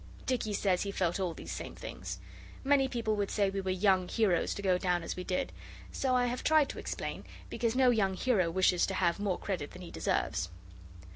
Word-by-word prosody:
Dicky 245 Hz, -4 st, 0 dB
says 190 Hz, -2 st, +1 dB
he 200 Hz, -, -2 dB
felt 180 Hz, -2 st, 0 dB
all 180 Hz, -4 st, -1 dB
these -, -, -7 dB
same -, -, -6 dB
things. -, -, -6 dB, 0.5 s
Many 275 Hz, -1 st, +4 dB
people 230 Hz, -4 st, -1 dB
would 200 Hz, -1 st, 0 dB
say 200 Hz, -2 st, +1 dB
we 195 Hz, 0 st, -2 dB
were 190 Hz, -, -3 dB
young 185 Hz, -1 st, +3 dB
heroes 200 Hz, -6 st, +1 dB
to 200 Hz, -, -6 dB
go 185 Hz, -2 st, +3 dB
down 180 Hz, -2 st, +1 dB
as -, -, -4 dB
we 180 Hz, -, -5 dB
did; 180 Hz, 0 st, -1 dB, 0.4 s
so 260 Hz, -2 st, 0 dB
I 250 Hz, 0 st, +3 dB
have 245 Hz, +1 st, -2 dB
tried 310 Hz, -2 st, +4 dB
to -, -, -6 dB
explain, -, -, -4 dB, 0.3 s
because 230 Hz, -1 st, 0 dB
no 255 Hz, -1 st, +5 dB
young 195 Hz, -5 st, +2 dB
hero 190 Hz, -6 st, +2 dB
wishes 180 Hz, 0 st, +3 dB
to 195 Hz, -, -2 dB
have 175 Hz, 0 st, +1 dB
more 200 Hz, -3 st, 0 dB
credit 175 Hz, -8 st, -3 dB
than 180 Hz, -, -9 dB
he 170 Hz, -, -9 dB
deserves. -, -, -1 dB
195 Hz, 215 wpm, -31 LUFS, 180-235 Hz, 0.5 s, no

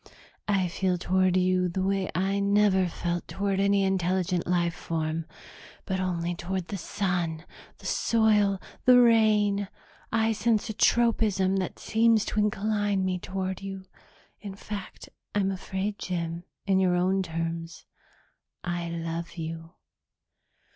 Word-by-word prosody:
"I 195 Hz, -3 st, +2 dB
feel 180 Hz, +1 st, 0 dB
toward 185 Hz, +1 st, +2 dB
you 185 Hz, 0 st, +2 dB
the 185 Hz, +2 st, -2 dB
way 195 Hz, -1 st, 0 dB
I 195 Hz, +2 st, +1 dB
never 200 Hz, -2 st, +3 dB
felt 175 Hz, 0 st, -3 dB
toward 195 Hz, -1 st, -1 dB
any 200 Hz, 0 st, +3 dB
intelligent 185 Hz, -2 st, 0 dB
life 175 Hz, -1 st, +1 dB
form, 160 Hz, 0 st, -3 dB, 0.6 s
but 190 Hz, 0 st, -2 dB
only 175 Hz, -2 st, -1 dB
toward 180 Hz, +1 st, -4 dB
the 200 Hz, -, -3 dB
sun, 175 Hz, -4 st, -2 dB, 0.3 s
the -, -, -16 dB
soil, 210 Hz, -4 st, +2 dB, 0.3 s
the 250 Hz, -1 st, +8 dB
rain. 215 Hz, -4 st, +4 dB, 0.4 s
I 225 Hz, 0 st, +2 dB
sense 220 Hz, 0 st, +1 dB
a -, -, -6 dB
tropism 210 Hz, -5 st, +2 dB
that 185 Hz, -2 st, -3 dB
seems 225 Hz, -1 st, +3 dB
to 215 Hz, -, -1 dB
incline 205 Hz, -1 st, +1 dB
me 185 Hz, -1 st, -1 dB
toward 190 Hz, 0 st, -4 dB
you. 195 Hz, -1 st, -7 dB, 0.5 s
In 200 Hz, -2 st, -8 dB
fact, 200 Hz, -1 st, -7 dB, 0.3 s
I'm 195 Hz, -1 st, +2 dB
afraid, 195 Hz, +2 st, -3 dB
Jim, 170 Hz, -1 st, -3 dB, 0.2 s
in 190 Hz, -1 st, +3 dB
your 185 Hz, -2 st, +3 dB
own 185 Hz, +2 st, +2 dB
terms, 165 Hz, -1 st, -4 dB, 0.8 s
I 175 Hz, -1 st, -3 dB
love 170 Hz, +1 st, -5 dB
you." 165 Hz, +1 st, -6 dB
190 Hz, 135 wpm, -27 LUFS, 175-200 Hz, 0.8 s, the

